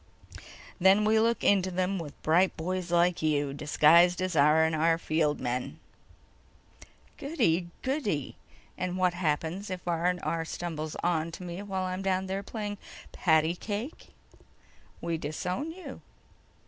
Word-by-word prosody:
"Then 190 +3 +5
we 220 +1 +4
look 230 +1 +1
into 190 -2 +3
them 185 +1 -1
with 150 -4 -8
bright 175 +4 +3
boys 180 +2 -3
like 175 0 +3
you—disguised 150 +3 +3
as 185 -2 -2
R&R 160 +2 +4
field 155 -2 0
men." 125 0 -3 1.4
"Goody, 180 - 0
goody. 255 - -2 0.4
And 185 0 -2
what 180 -1 +2
happens 170 +3 -2
if 185 -1 -6
R&R 170 -1 0
stumbles 160 -2 -5
onto 165 0 -1
me 175 +1 -6
while 195 -2 -3
I'm 185 0 -3
down 190 -1 0
there 190 +1 -3
playing 205 0 -5 0.3
patty 160 -1 +2
cake?" 210 - -5 0.9
"We 170 -1 -2
disown 180 - -3
you." 365 +3 -10
175 Hz, 120 wpm, -29 LUFS, 160-190 Hz, 1.4 s, Then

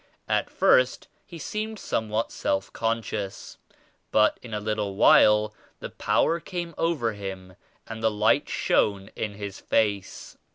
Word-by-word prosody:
At - - 0
first - - +3 0.2
he 170 - -9
seemed 215 +7 -4
somewhat 110 - -2
self 95 0 -2
conscious 115 -3 -3 0.5
but 105 0 +3
in 120 - -11
a 105 - -2
little 105 -2 -2
while 105 +1 +5 0.3
the - - -7
Power 170 - +1
came 170 -1 -5
over 150 -10 0
him 95 -2 -7 0.3
and 110 0 -7
the 110 - +3
Light 110 +1 +2
shone 100 -1 +1
in 105 -2 -4
his 100 -1 -7
face. 100 -3 -1
110 Hz, 135 wpm, -26 LUFS, 100-115 Hz, 0.5 s, while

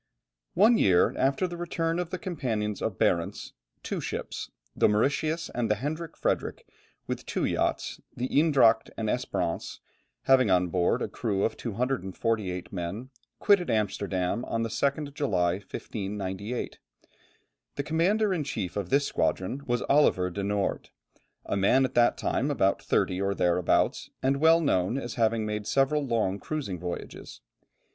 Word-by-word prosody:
One 220 +5 +5
year 90 -3 +4
after 135 +6 +1
the 175 -1 -7
return 165 -1 -1
of 175 -2 -2
the 185 - -3
companions 115 - -3
of 105 -5 -2
Barentz, 85 -1 0 0.3
two - - -3
ships, - - -5 0.3
the - - +4
Mauritius 150 +9 0
and 120 -2 -1
the 105 - +3
Hendrik 155 +7 -5
Fredrik, - - -1 0.4
with - - -4
two - - -2
yachts, - - -1 0.2
the 125 - -1
Eendracht 135 -7 +4
and 110 -1 -1
Espérance, - - -2 0.5
having 130 -4 +4
on 90 -1 +3
board 90 0 +1
a - - -1
crew 100 -3 -2
of - - 0
248 110 -5 -2
men, 95 +8 -5 0.3
quitted 200 -4 +3
Amsterdam 100 -1 -1
on 115 0 -1
the 115 - -2
2nd 140 +5 -1
July, 95 - +1
1598. 100 +2 -5 1.0
The 140 - -2
commander 190 +7 +2
in 165 -5 -1
chief 115 -10 -4
of 100 -3 -3
this 140 +1 +3
squadron 95 - -1
was 120 -1 0
Oliver 95 -11 +3
de 100 - -4
Noort, 100 0 -1 0.6
a - - -2
man 115 +7 +4
at 130 - -4
that 120 0 +4
time 140 - 0
about 100 -9 +1
thirty 95 +1 0
or 100 0 0
thereabouts, 90 0 +1
and 135 +1 +2
well 160 +3 +5
known 105 - +1
as 120 -4 -4
having 115 -1 +1
made 105 -1 -3
several 140 +2 +2
long 110 -6 0
cruising 130 - -4
voyages. 90 0 -7
115 Hz, 150 wpm, -28 LUFS, 100-145 Hz, 1.0 s, One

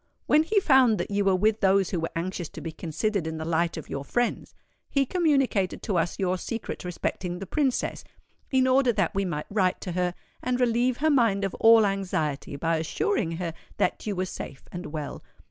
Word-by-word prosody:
When 300 - +5
he 405 +7 +2
found 265 - +5
that 175 - -3
you 205 0 +1
were 195 -1 +3
with 215 +3 +2
those 195 -1 +3
who 180 - 0
were 165 - -2
anxious 175 -1 -3
to - - -9
be 165 - -5
considered 170 +3 -2
in 160 0 -4
the 160 - -4
light 170 +1 0
of 160 - -7
your 140 - -4
friends, 240 - -2 0.3
he 275 -1 +2
communicated 275 - +1
to 200 -6 0
us 165 +1 -1
your 185 -1 0
secret 230 +4 -5
respecting 180 0 -3
the 195 - -6
Princess, 270 - -1 0.5
in 260 -1 +3
order 260 -1 +4
that 195 -6 0
we 195 0 0
might 150 -4 -3
write 190 -3 +1
to 180 - -4
her 180 0 -1 0.3
and 250 0 -1
relieve 245 0 +2
her 310 +1 +2
mind 230 -8 +3
of 195 - -1
all 225 -1 +7
anxiety 180 -8 -2
by 165 +3 0
assuring 170 - -1
her 165 -1 -3 0.2
that - - 0
you 205 - -1
were 185 +1 -1
safe 145 -6 -8
and 175 +1 -6
well. 150 -1 -5
195 Hz, 205 wpm, -26 LUFS, 170-240 Hz, 0.5 s, all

